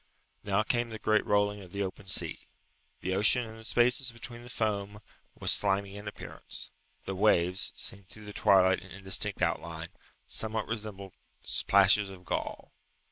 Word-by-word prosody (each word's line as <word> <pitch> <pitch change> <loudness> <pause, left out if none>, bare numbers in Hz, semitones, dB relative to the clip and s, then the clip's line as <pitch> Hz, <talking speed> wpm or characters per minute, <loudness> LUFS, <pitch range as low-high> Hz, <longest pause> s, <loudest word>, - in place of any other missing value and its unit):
Now 100 +1 +2
came 120 +1 0
the 110 - -6
great 110 0 +2
rolling 105 0 +2
of 90 -2 -13
the 100 0 -1
open 95 0 -6
sea. - - -3 0.5
The 95 - -1
ocean 110 +5 +3
in 110 0 -10
the 110 - -12
spaces 125 +3 +2
between 120 +1 -8
the 120 - -11
foam 105 -2 -2 0.4
was - - +5
slimy 100 0 +2
in 105 +1 -8
appearance. 105 - -6 0.3
The 95 - -4
waves, 90 -2 +3
seen 100 0 -4
through 105 +3 -13
the 105 - -8
twilight 95 -3 +5
in 95 - -14
indistinct 95 +1 -1
outline, - - -2 0.4
somewhat 110 -1 -2
resembled 105 -4 -5 0.5
plashes 100 +1 +5
of 90 -2 -12
gall. - - -3
105 Hz, 160 wpm, -30 LUFS, 95-110 Hz, 0.5 s, was